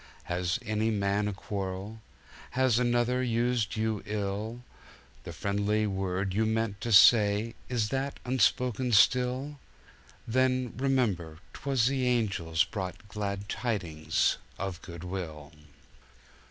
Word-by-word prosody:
Has 90 Hz, 0 st, -1 dB
any 110 Hz, +1 st, 0 dB
man 100 Hz, -1 st, 0 dB
a -, -, -1 dB
quarrel? 95 Hz, +2 st, -5 dB, 0.6 s
Has 130 Hz, -3 st, +3 dB
another 120 Hz, +1 st, +2 dB
used 120 Hz, -3 st, 0 dB
you 110 Hz, -1 st, -1 dB
ill? 105 Hz, +3 st, -3 dB, 0.6 s
The -, -, -6 dB
friendly 105 Hz, +2 st, 0 dB
word 95 Hz, -1 st, -2 dB
you 110 Hz, +3 st, +2 dB
meant 110 Hz, -2 st, -1 dB
to 115 Hz, -, -2 dB
say, 105 Hz, +1 st, +6 dB, 0.2 s
Is 115 Hz, -4 st, 0 dB
that 135 Hz, +1 st, -2 dB
unspoken 125 Hz, 0 st, +1 dB
still?— 130 Hz, +6 st, +3 dB, 0.7 s
Then, 130 Hz, 0 st, +1 dB
remember, 115 Hz, -12 st, 0 dB, 0.2 s
'twas 135 Hz, -4 st, 0 dB
the 130 Hz, -1 st, +1 dB
Angels 95 Hz, -9 st, +1 dB
Brought 95 Hz, +1 st, -6 dB
glad 100 Hz, 0 st, -4 dB
tidings 85 Hz, -9 st, 0 dB, 0.2 s
of 95 Hz, -2 st, -4 dB
good 85 Hz, -2 st, -9 dB
will! 80 Hz, -6 st, -6 dB
105 Hz, 115 wpm, -29 LUFS, 95-125 Hz, 0.7 s, say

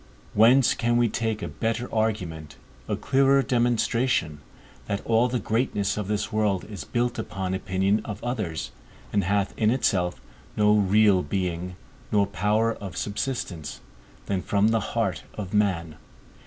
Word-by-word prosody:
Whence 120 Hz, +4 st, +5 dB
can 120 Hz, 0 st, +1 dB
we 120 Hz, -1 st, +3 dB
take 110 Hz, -2 st, -2 dB
a -, -, -2 dB
better 115 Hz, +2 st, -2 dB
argument, 90 Hz, -10 st, -2 dB, 0.3 s
a -, -, 0 dB
clearer 135 Hz, 0 st, +3 dB
demonstration, 120 Hz, -, +1 dB, 0.5 s
that 100 Hz, -, -3 dB
all 115 Hz, +2 st, +3 dB
the 125 Hz, 0 st, -1 dB
greatness 110 Hz, -4 st, 0 dB
of 105 Hz, -2 st, -3 dB
this 105 Hz, +1 st, -2 dB
world 105 Hz, -4 st, +1 dB
is 105 Hz, -3 st, -7 dB
built 120 Hz, 0 st, -1 dB
upon 95 Hz, -4 st, -3 dB
opinion 95 Hz, +2 st, 0 dB
of 105 Hz, -1 st, -7 dB
others 105 Hz, -, -3 dB, 0.4 s
and 100 Hz, -1 st, +2 dB
hath 100 Hz, +1 st, 0 dB
in 110 Hz, -, +3 dB
itself 95 Hz, -8 st, +1 dB, 0.4 s
no 105 Hz, 0 st, +5 dB
real 105 Hz, -1 st, +4 dB
being, 90 Hz, -1 st, -3 dB, 0.4 s
nor 100 Hz, -1 st, +4 dB
power 105 Hz, +4 st, +1 dB
of 100 Hz, -4 st, -8 dB
subsistence, 105 Hz, -, -3 dB, 0.5 s
than 95 Hz, -2 st, -1 dB
from 100 Hz, +3 st, +2 dB
the 115 Hz, 0 st, +2 dB, 0.2 s
heart 105 Hz, -5 st, 0 dB
of 100 Hz, -2 st, -6 dB
man? 85 Hz, -7 st, 0 dB
105 Hz, 145 wpm, -25 LUFS, 95-115 Hz, 0.5 s, Whence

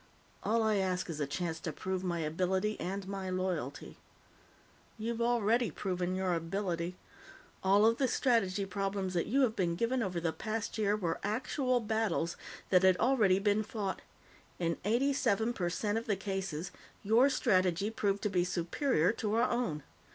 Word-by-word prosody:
"All 225 Hz, +1 st, +1 dB
I 215 Hz, -1 st, +2 dB
ask 185 Hz, -2 st, -1 dB
is 155 Hz, -, -6 dB
a 145 Hz, -, -1 dB
chance 160 Hz, +3 st, -3 dB
to 160 Hz, -, -4 dB
prove 185 Hz, +3 st, -3 dB
my 175 Hz, -2 st, -1 dB
ability 185 Hz, +6 st, 0 dB
and 195 Hz, +1 st, -4 dB
my 195 Hz, -1 st, -4 dB
loyalty." 180 Hz, -7 st, -3 dB, 1.0 s
"You've 230 Hz, +1 st, -3 dB
already 235 Hz, -1 st, +2 dB
proven 180 Hz, +1 st, -2 dB
your 185 Hz, -1 st, 0 dB
ability. 170 Hz, +1 st, -2 dB, 0.7 s
All 200 Hz, +2 st, +5 dB
of 230 Hz, +1 st, +3 dB
the 265 Hz, -, +3 dB
strategy 205 Hz, -7 st, +1 dB
problems 195 Hz, -1 st, -2 dB
that 170 Hz, -, 0 dB
you 270 Hz, +5 st, +2 dB
have 235 Hz, -4 st, +2 dB
been 175 Hz, -4 st, 0 dB
given 235 Hz, +7 st, 0 dB
over 185 Hz, -5 st, -1 dB
the 165 Hz, -1 st, -1 dB
past 220 Hz, 0 st, -4 dB
year 205 Hz, -1 st, +2 dB
were 175 Hz, -5 st, -2 dB
actual 250 Hz, +4 st, 0 dB
battles 215 Hz, -6 st, 0 dB, 0.4 s
that 180 Hz, -1 st, +6 dB
had 190 Hz, -1 st, +5 dB
already 225 Hz, -7 st, +4 dB
been 205 Hz, +1 st, +2 dB
fought. 210 Hz, -3 st, -4 dB, 0.6 s
In 170 Hz, -1 st, -1 dB
eighty 250 Hz, +7 st, +2 dB
seven 225 Hz, -2 st, +1 dB
per 175 Hz, -6 st, -1 dB
cent 205 Hz, +4 st, -1 dB
of 230 Hz, -, -11 dB
the 205 Hz, -, +2 dB
cases, 190 Hz, -4 st, -4 dB, 0.3 s
your 230 Hz, +7 st, +5 dB
strategy 190 Hz, -5 st, +2 dB
proved 200 Hz, -3 st, -1 dB
to 210 Hz, -, +1 dB
be 180 Hz, -2 st, +2 dB
superior 180 Hz, -, +1 dB
to 215 Hz, -1 st, -2 dB
our 235 Hz, +2 st, +3 dB
own. 205 Hz, -, -1 dB
195 Hz, 170 wpm, -32 LUFS, 180-225 Hz, 1.0 s, that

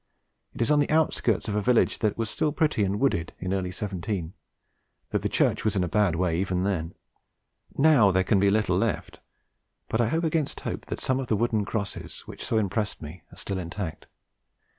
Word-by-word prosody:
It -, -, 0 dB
is 115 Hz, -, 0 dB
on 150 Hz, -, +5 dB
the 145 Hz, -, +1 dB
outskirts 155 Hz, -, +1 dB
of 105 Hz, -, -2 dB
a 105 Hz, -, +1 dB
village 120 Hz, +2 st, +2 dB
that 105 Hz, -2 st, 0 dB
was 115 Hz, -1 st, -1 dB
still 150 Hz, +8 st, 0 dB
pretty 150 Hz, -, +1 dB
and 100 Hz, +1 st, 0 dB
wooded 85 Hz, -12 st, 0 dB
in 90 Hz, +1 st, -3 dB
early 95 Hz, -2 st, -1 dB
'17, 95 Hz, -2 st, -4 dB, 0.8 s
though -, -, +2 dB
the -, -, -2 dB
church -, -, +1 dB
was 110 Hz, -, +1 dB
in 95 Hz, -, +2 dB
a -, -, 0 dB
bad 100 Hz, -2 st, +2 dB
way 85 Hz, -1 st, +1 dB
even 90 Hz, -1 st, 0 dB
then. 90 Hz, -4 st, -2 dB, 0.8 s
Now 140 Hz, -8 st, +6 dB
there 95 Hz, 0 st, +3 dB
can 100 Hz, +1 st, +3 dB
be 100 Hz, +1 st, +4 dB
little 110 Hz, +1 st, +2 dB
left; -, -, -2 dB, 0.7 s
but 110 Hz, -, +1 dB
I 115 Hz, -, +2 dB
hope 165 Hz, +8 st, 0 dB
against 160 Hz, -3 st, -1 dB
hope -, -, -5 dB
that -, -, -4 dB
some 130 Hz, 0 st, 0 dB
of 130 Hz, -, -4 dB
the 110 Hz, -, +2 dB
wooden 110 Hz, -2 st, +1 dB
crosses 100 Hz, -2 st, -4 dB
which -, -, -9 dB
so 110 Hz, -, 0 dB
impressed 105 Hz, -2 st, -1 dB
me 75 Hz, +3 st, -9 dB
are -, -, -14 dB
still 95 Hz, -1 st, -3 dB
intact. 85 Hz, -1 st, -5 dB
105 Hz, 205 wpm, -26 LUFS, 95-120 Hz, 0.8 s, Now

